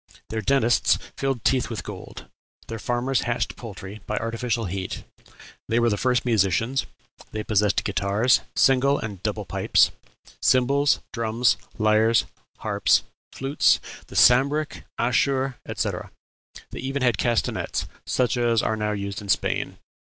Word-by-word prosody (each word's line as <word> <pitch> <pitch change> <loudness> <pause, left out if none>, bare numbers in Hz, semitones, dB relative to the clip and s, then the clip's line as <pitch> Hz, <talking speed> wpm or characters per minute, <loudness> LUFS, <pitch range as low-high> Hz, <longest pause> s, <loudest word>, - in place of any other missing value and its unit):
Their 110 0 -2
dentists 125 -2 +3 0.2
filled 135 -4 -2
teeth 130 -2 +2
with 115 - -5
gold; - - -9 0.4
their 115 -1 -6
farmers 120 +3 0
hatched 120 0 -2
poultry 105 -2 -9
by 105 - -2
artificial 115 0 -2
heat. 95 +1 -4 0.7
They 115 - +2
were 120 -1 +3
the - - +2
first 125 +3 +1
musicians; 115 +3 +1 0.4
they 110 0 -4
possessed 105 -3 +2
guitars, 100 +6 +2
single 135 +1 +4
and 100 -4 -6
double 105 -1 -3
pipes, 85 - +3 0.5
cymbals, 140 +3 +3
drums, 115 -2 +2 0.2
lyres, 110 +1 +3 0.4
harps, - - +2 0.3
flutes, 135 +2 +2 0.3
the - - -12
sambric, 140 +5 +3
ashur, 130 +1 +1
etc.; - - -3 0.6
they - - -7
had - - -7
even 135 -3 +1
castanets, 115 +1 -1 0.2
such 125 -1 +1
as 120 -2 +2
are 110 - 0
now 105 -1 -1
used 100 -1 -4
in 100 - -10
Spain. - - 0
115 Hz, 135 wpm, -24 LUFS, 105-130 Hz, 0.7 s, single